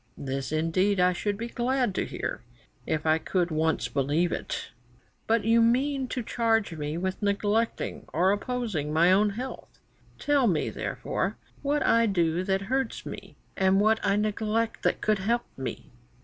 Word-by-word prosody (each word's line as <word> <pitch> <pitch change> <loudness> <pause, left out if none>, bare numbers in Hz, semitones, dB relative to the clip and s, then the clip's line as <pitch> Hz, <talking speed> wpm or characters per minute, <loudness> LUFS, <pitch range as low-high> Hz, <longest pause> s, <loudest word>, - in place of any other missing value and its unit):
This 135 0 -4
indeed 180 +5 +1
I 180 0 +4
should 205 +3 -2
be 230 +2 -4
glad 245 -2 0
to - - -1
hear - - -4 0.5
if 155 -1 -1
I 160 0 +3
could 175 0 -1
once 160 +1 +1
believe 150 +5 +1
it. - - -4 0.6
But 225 0 +2
you 230 +1 +5
mean 260 +3 +2
to 250 -1 -3
charge 225 -4 +1
me 150 +1 -3
with 190 +3 -3
neglecting 205 +2 -1
or 180 +5 +3
opposing 205 - -2
my 165 +3 +4
own 205 +3 +4
health. 250 +6 -7 0.4
Tell 285 -4 +2
me, 165 -7 +1
therefore, - - -3 0.2
what 290 +1 0
I 230 0 +4
do 175 -3 +1
that 195 0 +1
hurts 265 +6 -2
me, - - -8 0.2
and 190 0 +3
what 220 +2 +3
I 200 - +2
neglect 215 +2 -1
that - - 0
would 215 -2 +3
help 235 +5 0
me." 130 - -6
205 Hz, 165 wpm, -27 LUFS, 170-230 Hz, 0.6 s, you